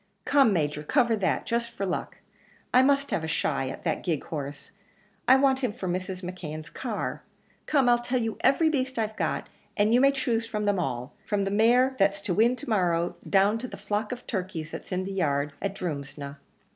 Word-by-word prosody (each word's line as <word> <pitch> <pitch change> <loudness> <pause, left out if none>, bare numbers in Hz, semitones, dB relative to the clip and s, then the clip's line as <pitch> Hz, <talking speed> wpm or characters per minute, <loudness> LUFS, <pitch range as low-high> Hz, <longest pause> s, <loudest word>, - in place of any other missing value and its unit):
"Come, 275 -6 +5
Major, 150 -5 0
cover 235 - +2
that, 195 -2 0
just 235 0 -1
for 200 - -4
luck; 185 - -3 0.6
I 255 - +7
must 275 +1 +2
have 160 - 0
a - - -2
shy 140 -4 0
at 135 - -8
that - - -1
gig 165 -5 -1
horse; 145 -2 -6 0.6
I 260 - +8
want 265 -1 +3
him 250 -5 0
for 190 -2 -6
Mrs. 185 +1 -3
McKeon's 155 -4 -6
car. 235 -5 -4 0.5
Come, 275 -4 +3
I'll 240 0 +5
tell 245 +1 -1
you 225 -2 -3
every 315 +4 +4
beast 265 -4 0
I've 220 -1 -1
got, - - -2 0.3
and 210 +2 +3
you 245 - +5
may 275 0 +6
choose 240 -4 -1
from 210 -2 -2
them 205 -2 +2
all, 125 -4 -3
from 205 -1 0
the 195 - -1
mare 245 +5 +4
that's 195 0 +3
to 200 -2 -1
win 230 +6 +4
to 290 - -10
morrow, 175 -4 +1
down 200 +3 +4
to 255 - -5
the - - -9
flock 210 +2 -2
of 250 0 -6
turkeys 180 -6 -4
that's - - -8
in 185 0 0
the 195 - -5
yard 145 -5 0
at 200 0 -2
Drumsna." 140 -4 -5
205 Hz, 210 wpm, -27 LUFS, 170-245 Hz, 0.6 s, I